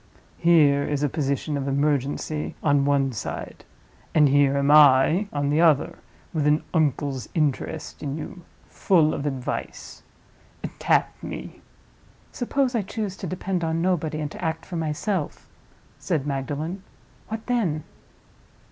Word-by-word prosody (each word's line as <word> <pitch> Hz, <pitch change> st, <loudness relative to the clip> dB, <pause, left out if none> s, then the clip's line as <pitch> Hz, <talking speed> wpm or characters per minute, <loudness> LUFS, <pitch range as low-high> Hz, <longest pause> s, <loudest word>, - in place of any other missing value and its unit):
Here 150 Hz, -4 st, +5 dB
is 145 Hz, 0 st, -1 dB
a 145 Hz, -, +2 dB
position 140 Hz, +1 st, -1 dB
of 140 Hz, 0 st, -3 dB
emergency 145 Hz, +2 st, -1 dB
on 145 Hz, -2 st, +3 dB
one 140 Hz, -1 st, +2 dB
side—and 145 Hz, +6 st, -3 dB
here 140 Hz, 0 st, +4 dB
am 140 Hz, +1 st, +2 dB
I, 150 Hz, +6 st, +6 dB
on 145 Hz, -1 st, -1 dB
the 155 Hz, +3 st, +3 dB
other, 155 Hz, -5 st, +3 dB, 0.3 s
with 150 Hz, -3 st, +1 dB
an 150 Hz, +1 st, +3 dB
uncle's 140 Hz, -, 0 dB
interest 150 Hz, 0 st, -2 dB
in 140 Hz, 0 st, -3 dB
you, 175 Hz, +3 st, -7 dB, 0.3 s
full 165 Hz, -5 st, +2 dB
of 145 Hz, 0 st, -3 dB
advice. 130 Hz, -3 st, -5 dB, 0.8 s
Tap -, -, +2 dB
me." -, -, -7 dB, 0.7 s
"Suppose 265 Hz, +1 st, 0 dB
I 230 Hz, -, +1 dB
choose 205 Hz, 0 st, -4 dB
to 190 Hz, -, -5 dB
depend 185 Hz, +1 st, -2 dB
on 165 Hz, 0 st, 0 dB
nobody, 160 Hz, -4 st, 0 dB
and 150 Hz, -1 st, -3 dB
to -, -, -9 dB
act 160 Hz, -1 st, -2 dB
for 180 Hz, -, -7 dB
myself?" 160 Hz, +2 st, -2 dB, 0.5 s
said 155 Hz, -6 st, -1 dB
Magdalen. 145 Hz, +6 st, -3 dB, 0.5 s
"What 220 Hz, 0 st, -5 dB
then?" 190 Hz, -, 0 dB
150 Hz, 135 wpm, -24 LUFS, 140-170 Hz, 0.8 s, I